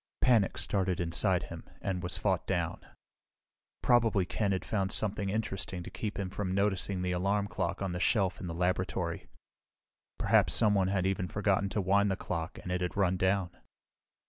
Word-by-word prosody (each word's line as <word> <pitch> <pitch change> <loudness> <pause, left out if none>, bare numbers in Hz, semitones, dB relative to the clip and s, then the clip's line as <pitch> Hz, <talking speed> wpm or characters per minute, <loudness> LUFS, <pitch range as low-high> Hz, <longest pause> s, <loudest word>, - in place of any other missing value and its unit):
Panic 115 -6 +3
started 95 -2 0
inside 90 +2 +1
him - - -8 0.2
and 95 -2 -2
was 90 0 +1
fought 95 -3 0
down. 85 -4 -1 1.0
Probably 115 -6 +4
Ken 100 +2 -1
had 95 - -1
found 95 -3 -1
something 100 -2 0
interesting 95 -4 -3
to - - -9
keep 105 -2 -4
him 95 -2 -3
from 95 -2 -2
noticing 100 -2 0
the 90 - 0
alarm 100 +3 +1
clock 95 -2 -2
on 90 -2 -2
a - - -2
shelf 95 -2 +1
in 90 - -4
the 85 - -4
laboratory. 90 -1 -1 0.9
Perhaps - - +3
someone 105 -3 +3
had 95 -1 0
even 95 -1 0
forgotten 100 0 +1
to 105 - -1
wind 100 +2 +3
the 95 - +1
clock 85 -2 -4
and 90 - -5
it 90 0 -1
had 90 -1 -2
run 95 -2 +3
down. 95 -1 +1
95 Hz, 175 wpm, -31 LUFS, 90-100 Hz, 1.0 s, Probably